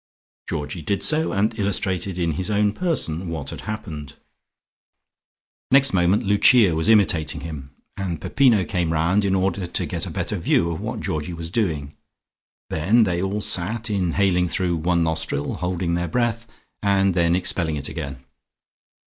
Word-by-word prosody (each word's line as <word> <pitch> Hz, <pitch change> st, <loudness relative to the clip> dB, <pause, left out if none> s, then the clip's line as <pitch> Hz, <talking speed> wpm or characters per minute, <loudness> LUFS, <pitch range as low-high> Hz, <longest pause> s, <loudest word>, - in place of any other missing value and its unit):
Georgie 75 Hz, +4 st, -4 dB
did 100 Hz, +5 st, -1 dB
so, 160 Hz, +1 st, +2 dB
and 110 Hz, +3 st, 0 dB
illustrated 95 Hz, -2 st, 0 dB
in 85 Hz, -2 st, 0 dB
his 90 Hz, +6 st, -3 dB
own 105 Hz, 0 st, +2 dB
person 95 Hz, -, -1 dB
what 80 Hz, -4 st, -4 dB
had -, -, -7 dB
happened. 85 Hz, -10 st, -6 dB, 1.5 s
Next 135 Hz, -2 st, +5 dB
moment 90 Hz, +2 st, +3 dB
Lucia 105 Hz, 0 st, +5 dB
was 80 Hz, +6 st, 0 dB
imitating 85 Hz, -8 st, +2 dB
him, 70 Hz, -4 st, -8 dB, 0.2 s
and 90 Hz, -5 st, -3 dB
Peppino 120 Hz, -9 st, +3 dB
came 90 Hz, -4 st, -1 dB
round 85 Hz, +6 st, +2 dB
in 95 Hz, -1 st, +1 dB
order 95 Hz, -1 st, 0 dB
to -, -, -2 dB
get -, -, -4 dB
a -, -, -5 dB
better -, -, -3 dB
view 85 Hz, 0 st, +1 dB
of 80 Hz, -, -5 dB
what -, -, -4 dB
Georgie 80 Hz, +3 st, -3 dB
was 85 Hz, 0 st, -6 dB
doing. 80 Hz, -10 st, -2 dB, 0.8 s
Then 100 Hz, +9 st, +3 dB
they 90 Hz, -4 st, 0 dB
all 100 Hz, +2 st, -2 dB
sat, 110 Hz, +5 st, -1 dB
inhaling 90 Hz, -1 st, +1 dB
through 85 Hz, 0 st, -1 dB
one 85 Hz, +1 st, +1 dB
nostril, 80 Hz, -3 st, -1 dB
holding 90 Hz, -1 st, -2 dB
their 85 Hz, +1 st, -1 dB
breath, 115 Hz, +4 st, -1 dB, 0.3 s
and 100 Hz, -1 st, +2 dB
then 85 Hz, 0 st, +2 dB
expelling 85 Hz, -3 st, 0 dB
it 70 Hz, -1 st, -4 dB
again. 70 Hz, -5 st, -6 dB
90 Hz, 155 wpm, -22 LUFS, 80-100 Hz, 1.5 s, Next